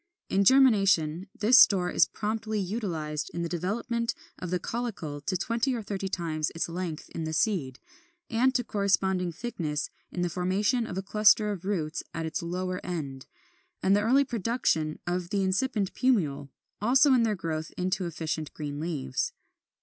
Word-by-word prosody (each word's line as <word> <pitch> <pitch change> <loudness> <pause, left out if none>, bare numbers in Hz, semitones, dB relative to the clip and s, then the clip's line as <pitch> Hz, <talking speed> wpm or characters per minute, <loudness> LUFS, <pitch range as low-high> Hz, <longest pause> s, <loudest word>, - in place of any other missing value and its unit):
In 195 - +3
germination 195 - +4
this 230 +5 +6
store 180 -3 +5
is - - +4
promptly 215 0 -2
utilized 170 -7 -3
in 170 - -2
the - - -1
development 225 +7 -2 0.2
of 180 - -5
the 180 +1 0
caulicle 190 -11 -4
to 185 +2 -1
twenty 235 +6 0
or 230 - -4
thirty 195 -1 -3
times 160 -4 -2
its 165 - -1
length 170 -2 -5
in 165 - -5
the 160 - -3
seed, 155 - 0 0.5
and 255 +3 +2
to 245 - +2
corresponding 190 -4 +1
thickness, 160 -6 -3 0.2
in 175 - -2
the 175 - 0
formation 200 +8 0
of 185 - -5
a 190 - -2
cluster 210 +1 +4
of 190 -3 -6
roots 170 -5 -1
at 165 -1 -2
its 160 +4 -3
lower 180 +2 -3
end, 140 -7 -5 0.6
and 195 +1 +4
the 205 - +3
early 260 +6 +4
production 225 - 0
of 175 0 -2
the 200 0 0
incipient 200 +1 0
plumule; 150 - +1 0.3
also 265 +5 +5
in 250 - +5
their 225 -2 +2
own - - -5
growth 160 -1 -3
into 185 0 -1
efficient 160 -2 -4
green 145 -1 -5
leaves. 165 - -2
185 Hz, 170 wpm, -28 LUFS, 165-220 Hz, 0.6 s, this